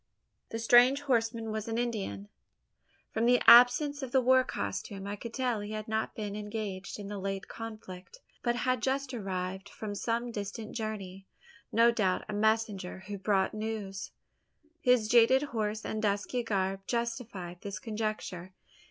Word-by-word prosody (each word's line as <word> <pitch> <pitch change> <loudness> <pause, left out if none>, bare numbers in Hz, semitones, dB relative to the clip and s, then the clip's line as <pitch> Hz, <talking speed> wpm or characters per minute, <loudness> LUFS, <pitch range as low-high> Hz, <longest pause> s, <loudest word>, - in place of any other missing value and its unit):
The 225 - -4
strange 245 +4 +6
horseman 230 -4 0
was 215 0 -3
an 225 0 -2
Indian. 200 - -3 0.8
From 225 +1 +1
the 245 0 +5
absence 250 +5 +7
of 265 -2 -5
the 265 - +4
war 260 +1 +5
costume, 195 - -4
I 200 +1 -3
could 230 +3 -8
tell 250 -3 -1
he 205 +1 -6
had 215 0 -5
not 220 0 -2
been 205 -2 -4
engaged 210 -2 -5
in 205 -2 -7
the 205 0 -5
late 195 0 -3
conflict, 215 - -9 0.2
but 240 -1 +1
had 255 +1 0
just 270 0 -1
arrived 190 -2 -4
from 210 -2 -6
some 235 +3 -2
distant 210 +1 -5
journey 195 -4 -5 0.4
no 230 +1 +5
doubt, 195 -6 0
a 215 - -5
messenger 210 -3 0
who 205 0 -6
brought 195 -1 +1
news. 215 -3 -4 0.7
His 250 -4 +4
jaded 240 +4 +5
horse 220 -5 -2
and 215 - -3
dusky 205 +4 0
garb 195 -4 -1
justified 230 -7 -3
this 200 -1 -5
conjecture. 215 -5 -4
215 Hz, 155 wpm, -30 LUFS, 200-235 Hz, 0.8 s, absence